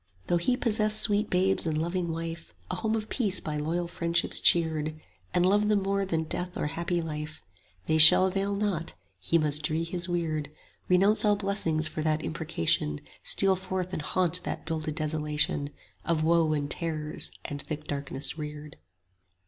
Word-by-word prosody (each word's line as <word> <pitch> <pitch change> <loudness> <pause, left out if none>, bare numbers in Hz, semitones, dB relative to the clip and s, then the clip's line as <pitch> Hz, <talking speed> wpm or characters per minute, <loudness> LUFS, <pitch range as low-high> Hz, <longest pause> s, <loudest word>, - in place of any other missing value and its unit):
Though 175 - +1
he 245 +9 0
possess 215 -3 +3
sweet 210 0 +3
babes 185 -1 +1
and 155 -1 0
loving 170 +1 -2
wife, 165 +1 -6 0.2
A - - -2
home 220 0 -1
of 215 -1 -3
peace 205 -7 +1
by 150 -1 -4
loyal 165 +4 -2
friendships 170 0 0
cheered, 155 -2 +2 0.3
And 180 0 +2
love 205 +2 +3
them 210 -2 +2
more 195 0 -1
than 165 -3 -1
death 180 +3 -3
or - - -2
happy 170 +1 -2
life, 150 -1 -6 0.5
They 160 - +1
shall 155 +4 +9
avail 195 +1 -1
not; 195 -5 -2 0.2
he 165 - +1
must 150 -2 +1
dree 155 +2 0
his 175 +1 -1
weird; 160 -4 -1 0.4
25 - - -30
Renounce 195 +4 +4
all 210 -1 +4
blessings 195 -6 0
for 155 - -5
that 155 0 0
imprecation, 85 - -1 0.2
Steal 195 -1 +2
forth 185 0 -4
and - - -3
haunt 180 +3 +2
that - - -5
builded 155 -2 -3
desolation, 150 -2 0 0.3
Of 165 -2 0
woe 165 -1 +3
and 145 -1 -1
terrors 155 -3 -2 0.2
and 145 -1 -5
thick 155 +1 -6
darkness 140 +2 -4
reared. 150 0 -8
165 Hz, 175 wpm, -28 LUFS, 155-190 Hz, 0.5 s, shall